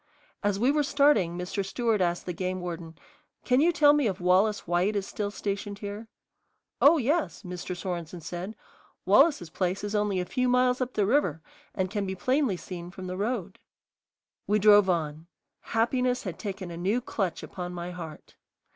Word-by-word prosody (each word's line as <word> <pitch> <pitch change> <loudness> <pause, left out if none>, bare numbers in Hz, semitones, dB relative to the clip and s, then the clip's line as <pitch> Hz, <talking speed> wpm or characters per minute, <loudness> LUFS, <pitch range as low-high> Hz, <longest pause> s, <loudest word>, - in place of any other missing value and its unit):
As 205 -1 +1
we 245 +6 +3
were 300 +1 +2
starting 280 - +3
Mr. 180 +2 -3
Stewart 220 +1 0
asked 175 -1 0
the 180 - -3
game 185 +2 -3
warden, 170 -2 -6 0.5
"Can 255 +1 +4
you 340 +3 +5
tell 295 -3 +5
me 295 -5 +2
if 190 -3 -2
Wallace 190 +4 +2
White 175 +5 +1
is 200 -1 -1
still 205 0 -3
stationed 200 0 -4
here?" 205 +2 -7 0.7
"Oh, 310 +4 +7
yes," 295 +2 0
Mr. 180 0 -5
Sorenson 175 -2 -5
said, 175 +6 -6 0.5
"Wallace's 180 - +4
place 185 +2 -1
is 205 0 -3
only 205 -2 +1
a 180 - -1
few 250 +6 0
miles 250 0 +3
up 255 0 -2
the 205 - +2
river 185 - +1 0.3
and 185 -1 -1
can 205 -2 -2
be 190 - -3
plainly 255 +1 +1
seen 175 -1 -8
from 185 +1 -9
the 180 0 -4
road." 200 -2 -3 0.9
We 210 - +3
drove 205 -1 +6
on. 160 -2 -1 0.3
Happiness 250 +2 0
had 185 -4 -6
taken 195 -4 -5
a 170 - -7
new 195 +7 +1
clutch 195 -8 -3
upon 180 -1 -6
my 175 0 -5
heart. 165 -4 -9
195 Hz, 180 wpm, -28 LUFS, 180-235 Hz, 0.9 s, Oh